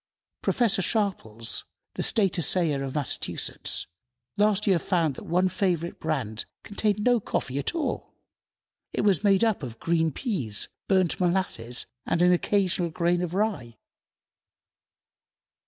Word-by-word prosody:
Professor 230 -6 +2
Sharples, 170 - -2 0.3
the - - -3
State 195 -5 +2
Assayer 160 -4 +3
of 135 +1 -5
Massachusetts, 145 -4 -2 0.5
last 210 0 +2
year 190 -5 +4
found 165 -6 +1
that - - -10
one 180 +2 +3
favorite 175 -3 -1
brand 130 -9 -2 0.2
contained 210 0 0
no 245 0 +4
coffee 135 -8 -2
at 145 - -1
all. 320 -3 -3 0.8
It - - 0
was 200 -2 +2
made 195 0 +4
up 220 -6 +2
of 120 -4 -6
green 165 +1 +1
peas, 135 - -2 0.2
burnt 185 -3 +2
molasses, 175 -10 0 0.2
and 165 - +1
"an 180 0 +6
occasional 180 -1 +1
grain 175 +2 +1
of 180 0 -3
rye." 190 - -1
180 Hz, 130 wpm, -26 LUFS, 150-200 Hz, 0.8 s, an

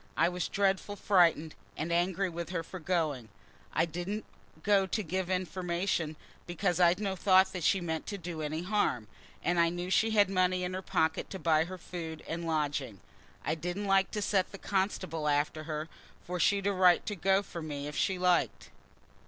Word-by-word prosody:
I 165 - +4
was 180 -1 -2
dreadful 195 0 0
frightened, 170 -6 +3 0.2
and 160 +3 -3
angry 180 +3 +1
with 170 -1 -5
her 170 -2 -2
for 185 +3 -8
going. 155 -9 -1 0.4
I - - +2
didn't 175 +6 -4 0.4
go 200 -2 +3
to 215 +3 -1
give 185 +2 -2
information, 180 -3 -1 0.3
because 175 0 0
I'd 175 +1 +5
no 195 -2 -1
thought 190 0 +4
she 190 +4 +3
meant 160 -2 -3
to 205 - -4
do 170 -3 -6
any 155 +2 -3
harm, 180 - 0 0.4
and 175 0 +1
I 170 0 +5
knew 175 +2 -4
she 225 +3 +3
had 210 -2 +4
money 185 -1 +1
in 180 0 -3
her 185 - -3
pocket 160 -3 0
to 190 - -5
buy 160 -3 +2
her 185 +1 -7
food 165 -3 -7
and 165 0 -4
lodging. 145 - -1 0.5
I 155 - +1
didn't 175 +5 -3
like 195 -1 +3
to 210 - 0
set 195 -3 +1
the 195 - -8
constable 185 -6 -1
after 150 +1 0
her, 155 0 -4 0.4
for 180 0 -4
she'd 200 +4 +2
a 200 - +2
right 185 -2 +4
to 210 - -3
go 195 +2 +2
from 170 -5 -7
me 145 -1 -4
if 150 0 -6
she 190 -2 +1
liked." 180 -1 +1
180 Hz, 190 wpm, -31 LUFS, 160-190 Hz, 0.5 s, I'd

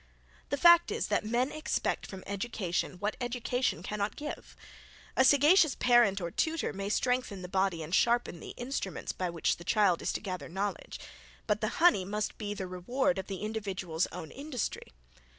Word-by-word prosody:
The 285 - 0
fact 345 +2 +7
is, - - -2
that - - +1
men 245 +4 +1
expect 310 - -2
from 190 -1 -9
education, 200 -3 -2
what 205 +4 -3
education 245 -6 -1
cannot 205 +1 -2
give. 300 +1 -7 0.6
A 260 - +5
sagacious 295 +3 +5
parent 240 -5 +4
or 170 -2 -4
tutor 320 - -1
may 195 0 -4
strengthen 250 -4 0
the - - -5
body 190 -3 0
and 155 +3 -8
sharpen 235 -5 +2
the - - -9
instruments 245 -6 -3
by 180 -1 -3
which 170 -1 0
the 170 - -10
child 195 -2 +3
is - - -1
to - - -2
gather 185 -5 -5
knowledge; 195 +2 -4 0.5
but 210 0 0
the 215 - +1
honey 335 - +5
must 210 +3 -3
be 205 -1 -3
the 190 - -4
reward 240 +9 -1
of 190 - -6
the 195 0 -5
individual's 195 -6 -2
own 165 -3 -8
industry. 280 -4 -4
210 Hz, 175 wpm, -30 LUFS, 185-250 Hz, 0.6 s, fact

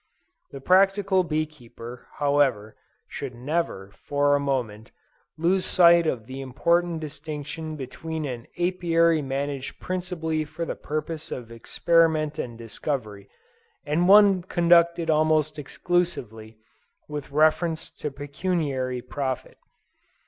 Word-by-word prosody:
The 140 - -9
practical 190 +3 +3
bee 155 -2 0
keeper, 120 -5 -12
however, 140 -7 +1 0.3
should 135 -3 -6
never, 125 - -3
for 145 +4 0
a - - +1
moment, 120 -6 -2 0.5
lose 180 +4 +2
sight 170 -2 +5
of 120 -7 -2
the 130 +2 -7
important 170 +6 0
distinction 155 +1 -6
between 155 +3 -5
an 125 -4 -6
Apiary 170 -2 +2
managed 135 0 -4
principally 175 -4 -2
for 165 +2 -5
the - - -3
purposes 155 +1 -5
of 120 -2 -6
experiment 155 +5 +1
and 120 -2 -5
discovery, 110 -3 -5 0.6
and 155 +4 +1
one 200 -2 +7
conducted 170 -1 +3
almost 155 0 +2
exclusively 125 -9 -2 0.5
with 150 -2 -6
reference 155 +2 +1
to 150 - -5
pecuniary 140 -3 -2
profit. 135 -3 -4
150 Hz, 110 wpm, -25 LUFS, 130-170 Hz, 0.6 s, one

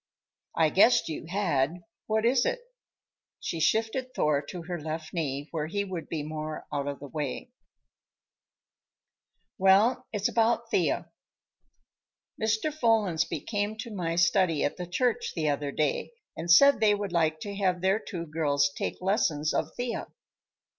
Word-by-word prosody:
"I 160 -1 +4
guessed 200 +1 +5
you 160 +1 -5
had. 175 -3 0 0.2
What 220 +1 +1
is 245 +1 +4
it?" - - 0 0.8
She 165 - -4
shifted 225 - 0
Thor 150 -2 +2
to 175 -2 -7
her 175 0 -4
left 155 0 -5
knee, 145 -4 -2
where 155 -2 -2
he 200 +5 -1
would 185 -4 -6
be 155 -3 -3
more 155 0 -5
out 145 -1 -1
of 140 -1 -3
the 145 - -8
way. 150 - -4 2.1
"Well, 195 +6 +4
it's 205 -2 0
about 230 0 +1
Thea. - - 0 1.3
Mr. 220 +7 0
Follansbee 215 - +1
came 205 0 -2
to 225 0 -6
my 170 -4 -2
study 170 -2 +3
at 145 - -1
the 180 - -5
church 240 +7 0
the 160 -3 0
other 145 0 -1
day 155 - -1 0.2
and 165 +2 -6
said 280 +11 +7
they 210 -2 +4
would 205 -2 -4
like 160 -2 +1
to 205 - -5
have 185 -3 +1
their 190 +3 +2
two 175 -6 -6
girls 145 -3 +1
take - - -3
lessons 165 -7 +1
of - - 0
Thea. 245 -1 -3
175 Hz, 155 wpm, -28 LUFS, 155-215 Hz, 2.1 s, said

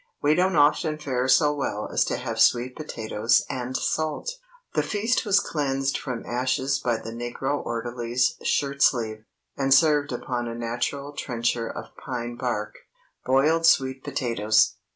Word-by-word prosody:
We 145 +1 +3
don't 185 +2 +2
often 155 +1 +3
fare 130 -4 -2
so 150 +2 +4
well 135 -7 -3
as - - +3
to - - -2
have - - -4
sweet 125 +1 +3
potatoes 115 -6 0
and 130 -1 -3
salt." 155 - -1 0.4
The - - +2
feast 225 +4 0
was 200 -1 +5
cleansed 135 -5 -1
from 125 -4 -4
ashes 130 +2 0
by 120 -2 0
the 115 0 -8
negro 120 +4 -3
orderly's 120 +1 -1
shirt 140 -1 -1
sleeve, 110 -5 +2 0.3
and 135 -1 -1
served 145 0 +4
upon 120 -1 -3
a 115 - -5
natural 120 +5 -3
trencher 120 -3 -2
of - - -8
pine 120 -2 -4
bark. - - -3 0.5
BOILED 155 +6 +3
SWEET 130 -4 +3
POTATOES. 115 -6 +2
130 Hz, 150 wpm, -25 LUFS, 120-145 Hz, 0.5 s, was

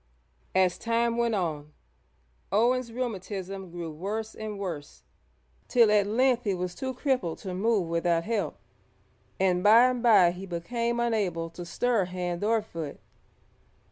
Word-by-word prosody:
As 185 -1 +3
time 230 0 +1
went 235 -1 +1
on, 155 -5 -3 0.8
Owen's 240 +3 +2
rheumatism 195 -5 -5
grew 170 -1 -6
worse 210 +7 -4
and 215 -1 -6
worse, 170 -7 -6 0.6
till 235 -4 +5
at 205 -1 +4
length 245 +3 +2
he 200 -3 0
was 180 0 -3
too 260 +4 -4
crippled 250 - -1
to 190 -2 -6
move 200 -1 +1
without 170 0 +1
help, 220 +2 -2 0.8
and 185 -2 +2
by 225 +3 +8
and 250 -1 -3
bye 205 -7 +6
he 185 +2 -8
became 235 +7 -2
unable 195 -8 -1
to 175 - -8
stir 235 +1 +1
hand 180 0 -4
or 220 0 +2
foot. 165 -8 -7
200 Hz, 140 wpm, -28 LUFS, 175-230 Hz, 0.8 s, by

